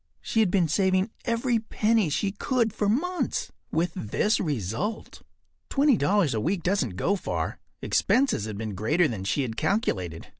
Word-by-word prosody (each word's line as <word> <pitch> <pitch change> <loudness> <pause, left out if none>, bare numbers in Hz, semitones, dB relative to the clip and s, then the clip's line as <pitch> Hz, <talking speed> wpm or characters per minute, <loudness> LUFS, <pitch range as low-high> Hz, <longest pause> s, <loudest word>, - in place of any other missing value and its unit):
She 225 - -1
had 215 -4 +4
been 180 -2 +2
saving 190 +4 +1
every 235 0 +1
penny 220 -3 +1
she 195 +7 0
could 230 0 0
for 205 - 0
months, 355 - -1 0.2
with 165 +1 0
this 190 - 0
result. 145 - -3 0.5
Twenty 280 -1 +4
dollars 190 - +2
a 110 - -1
week 175 - -1
doesn’t 180 - 0
go 190 - +1
far. 195 - -3 0.2
Expenses 260 - +2
had 105 -2 -5
been 110 -1 -4
greater 150 - +2
than 100 -7 -5
she 135 +8 0
had 115 -3 -5
calculated. 95 - -1
185 Hz, 160 wpm, -26 LUFS, -, 0.5 s, had